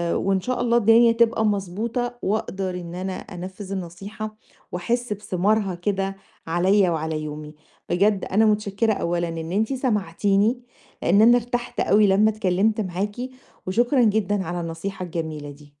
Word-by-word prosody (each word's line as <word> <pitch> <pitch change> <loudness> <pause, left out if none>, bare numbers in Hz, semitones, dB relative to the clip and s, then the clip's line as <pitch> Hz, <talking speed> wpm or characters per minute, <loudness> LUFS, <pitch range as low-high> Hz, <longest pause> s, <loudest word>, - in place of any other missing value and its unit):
وإن 195 0 +1
شاء 250 +3 -2
الله 235 -1 +3
الدنيا 230 +1 +6
تبقى 230 -1 +2
مضبوطة، 220 +5 -2
وأقدر 195 -2 -2
إن 170 0 -8
أنا 185 +1 -3
أنفذ 185 +2 -8
النصيحة، 195 +4 -6 0.4
وأحس 235 +6 -1
بثمارها 200 0 0
كده 195 +2 -2 0.3
عليَّ 185 +3 +3
وعلى 160 -1 -2
يومي. 150 0 -7 0.3
بجد 195 +2 +2
أنا 220 +3 +3
متشكرة 210 +1 +1
أولًا 170 -2 -1
إن 165 0 -5
أنتِ 220 +6 0
سمعتيني، 210 -1 +1 0.4
لإن 200 +5 +4
أنا 240 +2 +7
ارتحت 245 0 -3
أوي 210 0 +4
لمّا 205 +3 +4
اتكلّمت 215 +1 +1
معاكِ، 195 +2 -3 0.5
وشكرًا 240 +6 +3
جدًا 205 -2 +1
على 175 +1 -3
النصيحة 175 +3 -5
الجميلة 160 -4 -5
دي. 145 0 -16
195 Hz, 140 wpm, -23 LUFS, 175-220 Hz, 0.5 s, أنا